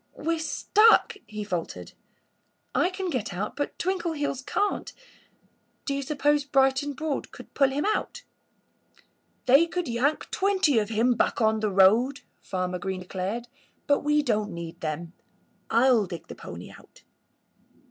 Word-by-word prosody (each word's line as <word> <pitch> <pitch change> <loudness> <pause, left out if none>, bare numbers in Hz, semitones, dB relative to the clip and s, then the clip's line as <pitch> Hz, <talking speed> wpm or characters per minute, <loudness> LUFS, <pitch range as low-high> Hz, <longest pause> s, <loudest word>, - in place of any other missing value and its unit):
"We're 330 0 -1
stuck!" 420 +8 +4
he 210 0 -5
faltered. 180 -5 -5 0.8
"I 350 - +2
can 370 -1 -4
get 225 - -3
out; 205 +4 -3
but 285 - -3
Twinkleheels 335 -7 -2
can't. 410 +8 -1 0.9
Do 280 - -1
you 280 - -2
suppose 290 +1 +1
Bright 270 -2 +3
and 290 -1 -5
Broad 310 -1 -3
could - - -13
pull 275 -2 +3
him 280 +5 -2
out?" 430 - -1 1.2
"They 275 +6 +6
could 355 +1 -3
yank 255 +6 0
twenty 380 - +2
of 210 -1 -2
him 230 +3 +2
back 235 - 0
on 220 -1 +2
the 215 -1 0
road," 215 +8 +4 0.2
Farmer 185 -1 -3
Green 190 0 -4
declared. 190 +6 -4 0.4
"But 285 - +3
we 295 0 +2
don't 215 -5 0
need 170 0 -7
them. 165 +2 -4 0.6
I'll 235 -3 +4
dig 170 -1 -7
the - - -9
pony - - -9
out." - - -18
265 Hz, 145 wpm, -26 LUFS, 210-295 Hz, 1.2 s, They